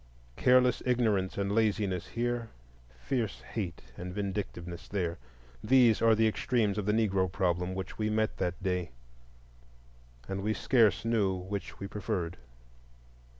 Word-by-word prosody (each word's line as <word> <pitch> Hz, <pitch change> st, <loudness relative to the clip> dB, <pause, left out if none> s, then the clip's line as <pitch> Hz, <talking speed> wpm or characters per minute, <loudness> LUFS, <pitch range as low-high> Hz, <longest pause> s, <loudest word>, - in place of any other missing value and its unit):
Careless 125 Hz, -, +4 dB
ignorance 110 Hz, -7 st, +1 dB
and 100 Hz, 0 st, 0 dB
laziness 105 Hz, -4 st, +1 dB
here, 120 Hz, -1 st, -2 dB, 0.5 s
fierce 115 Hz, -, -2 dB
hate 95 Hz, -7 st, -5 dB
and 90 Hz, +1 st, -6 dB
vindictiveness 95 Hz, -3 st, -4 dB
there;—these 85 Hz, -, +1 dB
are 115 Hz, -1 st, +5 dB
the 110 Hz, +1 st, +3 dB
extremes 110 Hz, -2 st, +1 dB
of 105 Hz, -, -3 dB
the -, -, +4 dB
Negro 100 Hz, -5 st, +1 dB
problem 90 Hz, -1 st, 0 dB
which 95 Hz, +3 st, -6 dB
we 110 Hz, 0 st, +1 dB
met 110 Hz, 0 st, 0 dB
that 90 Hz, +1 st, -2 dB
day, 90 Hz, -5 st, -1 dB, 1.3 s
and 95 Hz, 0 st, -3 dB
we 110 Hz, +2 st, 0 dB
scarce 115 Hz, -, +3 dB
knew 105 Hz, -5 st, +2 dB
which 95 Hz, +2 st, -6 dB
we 100 Hz, -, -4 dB
preferred. 100 Hz, -4 st, -3 dB
100 Hz, 130 wpm, -30 LUFS, 90-110 Hz, 1.3 s, are